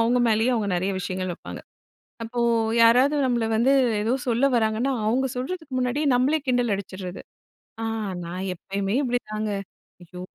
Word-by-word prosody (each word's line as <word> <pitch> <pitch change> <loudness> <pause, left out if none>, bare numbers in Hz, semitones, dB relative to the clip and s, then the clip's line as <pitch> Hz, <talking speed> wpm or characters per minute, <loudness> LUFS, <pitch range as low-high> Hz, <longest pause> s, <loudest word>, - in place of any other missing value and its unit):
அவுங்க 240 +2 +3
மேலய 225 +3 +2
அவுங்க 215 -3 -1
நிறைய 190 +3 -1
விஷயங்கள் 185 0 -3
வப்பாங்க. - - -9 0.6
அப்போ 240 +1 -4 0.4
யாராவது 250 +6 +5
நம்மள 240 -2 +1
வந்து 255 +5 +3 0.3
ஏதோ 225 +3 0 0.2
சொல்ல 240 +3 +2
வராங்கன்னா, 225 +4 +1
அவுங்க 260 +4 +2
சொல்றதுக்கு 300 +3 -5
முன்னாடியே 255 +4 0
நம்மளே 270 +6 +2
கிண்டல் 245 -3 +1
அடிச்சிர்றது. 185 -2 -6 0.6
"ஆ - - -1 0.4
நான் 180 +2 -5
எப்பயுமே 195 +3 -3
இப்பிடிதாங்க. 215 -4 -2 0.5
ஐயோ! 180 +1 -10
230 Hz, 140 wpm, -24 LUFS, 200-250 Hz, 0.6 s, யாராவது